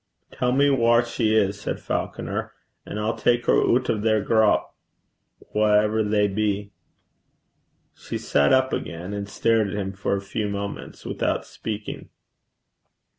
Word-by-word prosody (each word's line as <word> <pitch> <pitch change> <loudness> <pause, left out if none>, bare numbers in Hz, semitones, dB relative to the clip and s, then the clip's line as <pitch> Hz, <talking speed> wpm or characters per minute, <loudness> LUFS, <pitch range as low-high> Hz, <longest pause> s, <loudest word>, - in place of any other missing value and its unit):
'Tell 125 0 0
me 140 +3 +4
whaur 120 -3 +4
she 110 -2 0
is,' 100 -1 +1
said - - -3
Falconer, - - -3 0.3
'and 105 - -4
I'll 110 +2 -1
tak 120 0 +1
her - - +4
oot 125 +1 +3
o' 110 - 0
their 110 0 +2
grup, 110 +1 +2 0.8
whaever 105 +1 +3
they 105 -1 +2
be.' 100 0 -1 1.2
She - - -6
sat 70 0 +2
up 130 0 +3
again, 85 +4 -4
and 100 0 -4
stared 115 0 +2
at 100 - -5
him 95 -1 -3
for 95 +1 -1
a 100 - -3
few 105 +1 -3
moments 100 0 -6
without - - -1
speaking. 110 -1 -6
105 Hz, 145 wpm, -24 LUFS, 100-115 Hz, 1.2 s, me